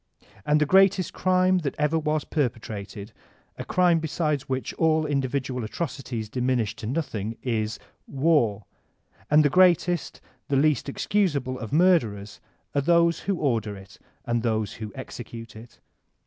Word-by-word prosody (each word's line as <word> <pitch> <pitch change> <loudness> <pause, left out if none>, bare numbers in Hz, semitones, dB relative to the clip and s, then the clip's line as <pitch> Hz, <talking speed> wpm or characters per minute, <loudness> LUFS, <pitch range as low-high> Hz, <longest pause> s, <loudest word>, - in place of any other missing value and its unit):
And 150 +1 +4
the 150 - +3
greatest 190 +1 +4
crime 185 0 +2
that 145 -5 -3
ever 150 +2 +1
was 155 -1 -1
perpetrated, 110 -6 -4 0.4
a - - -6
crime 175 -2 +3
beside 155 -2 -1
which 130 -3 -2
all 160 -1 +2
indi 140 -3 0
vidual 130 -2 -3
atrocities 125 -3 -4
diminish 125 -2 -1
to 110 - -6
nothing, 115 -6 -3
is 110 -4 -1 0.3
War; 135 -7 +1 0.6
and 150 +1 +5
the - - +4
greatest, 175 -2 +3 0.3
the 140 - 0
least 145 0 +2
excusable 140 -7 0
of 115 - -7
murderers 140 - +2 0.3
are 140 - +2
those 170 +2 +3
who 195 - -1
order 115 - -1
it 95 0 -15 0.3
and 120 -1 0
those 110 -2 -1
who 110 -1 -7
execute 115 -3 -9
it. 115 +2 -13
140 Hz, 145 wpm, -25 LUFS, 115-160 Hz, 0.6 s, and